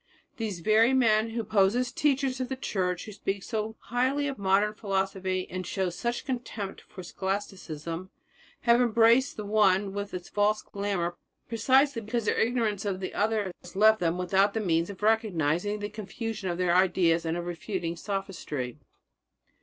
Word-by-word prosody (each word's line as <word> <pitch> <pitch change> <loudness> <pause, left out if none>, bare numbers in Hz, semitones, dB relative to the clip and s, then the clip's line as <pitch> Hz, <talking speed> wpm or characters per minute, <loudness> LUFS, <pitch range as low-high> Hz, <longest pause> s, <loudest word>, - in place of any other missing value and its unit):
These 210 -7 -3
very 220 +6 +4
men 225 -3 +3
who 230 0 -3
pose 195 0 +3
as 250 0 0
teachers 270 -2 +1
of 255 - -3
the 265 - -2
Church, 180 -7 -2
who 215 - -8
speak 195 -1 -3
so 220 0 -3
highly 260 +4 0
of 275 -5 -4
modern 200 +2 +2
philosophy 190 -2 -2
and 185 0 -5
show 185 0 -2
such 235 +7 -3
contempt 235 -7 -4
for 185 - -11
Scholasticism, 185 -3 -4 0.5
have 235 +1 +4
embraced 235 +2 +4
the 210 - -5
one 200 -2 +3
with 200 0 -4
its 180 -1 -6
false 210 +1 +1
glamour 195 -4 -2 0.3
precisely 260 +3 +3
because 225 +1 -2
their - - +1
ignorance 225 -4 +1
of 195 -3 -2
the 185 - -5
other 210 -2 0
has 180 - -13
left 215 +2 +5
them 170 0 0
without 195 +3 +2
the - - +1
means 170 -4 +1
of 200 0 -9
recognizing 205 -3 +1
the 205 0 -4
confusion 215 0 -5
of 170 - -2
their 180 -1 +2
ideas 175 -2 +3
and 165 +1 -1
of 175 - -4
refuting 175 0 -3
sophistry. 170 - -4
205 Hz, 170 wpm, -28 LUFS, 185-225 Hz, 0.5 s, left